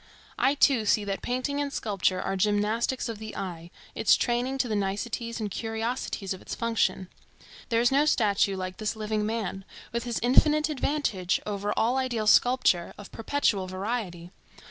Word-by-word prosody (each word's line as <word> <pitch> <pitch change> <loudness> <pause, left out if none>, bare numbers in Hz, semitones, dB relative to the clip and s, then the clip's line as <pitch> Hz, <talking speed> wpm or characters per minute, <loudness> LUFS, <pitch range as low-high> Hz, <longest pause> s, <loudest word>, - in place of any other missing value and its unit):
I 275 - +3
too 260 -6 +3
see 210 - +3
that 195 -1 -3
painting 255 +3 -2
and 285 -1 -2
sculpture 195 -6 0
are 195 - -2
gymnastics 210 +6 0
of 225 -3 -5
the 220 -1 -7
eye, 170 -3 -6 0.2
its - - +4
training 245 +2 0
to 255 - 0
the 220 - -1
niceties 220 +4 -2
and 210 -2 -3
curiosities 225 -2 -3
of 185 - -10
its - - -6
function. 225 -5 0 0.6
There 230 -1 +2
is 240 - +3
no 280 +2 +4
statue 205 -6 +2
like 185 0 -5
this 215 0 -2
living 215 -1 -2
man, 215 -4 -3 0.3
with 235 +1 -3
his 235 -2 -2
infinite 300 +5 +4
advantage 260 - 0
over 205 0 -2
all 240 +4 +2
ideal 245 -4 -1
sculpture, 210 -6 +3
of 205 - -11
perpetual 225 -6 0
variety. 185 -3 -4
220 Hz, 165 wpm, -27 LUFS, 195-245 Hz, 0.6 s, its